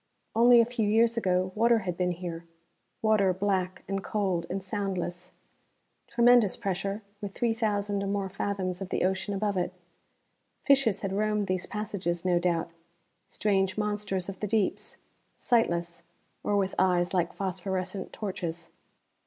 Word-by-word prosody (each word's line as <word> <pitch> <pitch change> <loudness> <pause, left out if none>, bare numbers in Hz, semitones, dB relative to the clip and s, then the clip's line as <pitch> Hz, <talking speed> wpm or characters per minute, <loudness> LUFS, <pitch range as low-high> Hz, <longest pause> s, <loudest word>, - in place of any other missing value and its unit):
Only 240 +1 +7
a 230 - +6
few 230 -3 -1
years 230 +2 +4
ago 185 -4 +1
water 230 +3 +4
had 180 -2 -2
been 180 0 0
here, 170 -1 -6 0.6
water 215 -3 +4
black 185 -2 -1
and 195 0 -2
cold 190 -5 -1
and 190 +1 -3
soundless. 185 -3 -3 0.8
Tremendous 235 -4 +4
pressure, 200 0 -3 0.2
with 200 -1 -6
three 235 -2 +1
thousand 205 -3 0
or 200 - -2
more 200 0 -1
fathoms 190 -1 -2
of 190 - -5
the - - 0
ocean 190 +2 0
above 200 0 -1
it. 180 0 0 0.9
Fishes 265 -8 +3
had 195 -1 -2
roamed 210 0 +1
these 185 -1 -2
passages, 195 -5 -3
no 175 -1 +3
doubt. 170 -1 0 0.6
Strange 195 -2 +1
monsters 205 -3 -1
of 195 -1 -7
the 210 - -2
deeps: 210 -1 -1 0.4
sightless, 170 -8 +1 0.4
or 205 - +1
with 195 -1 0
eyes 180 -1 +2
like 175 -2 +1
phosphorescent 190 0 -3
torches. 170 -5 -5
195 Hz, 145 wpm, -28 LUFS, 180-210 Hz, 0.9 s, Only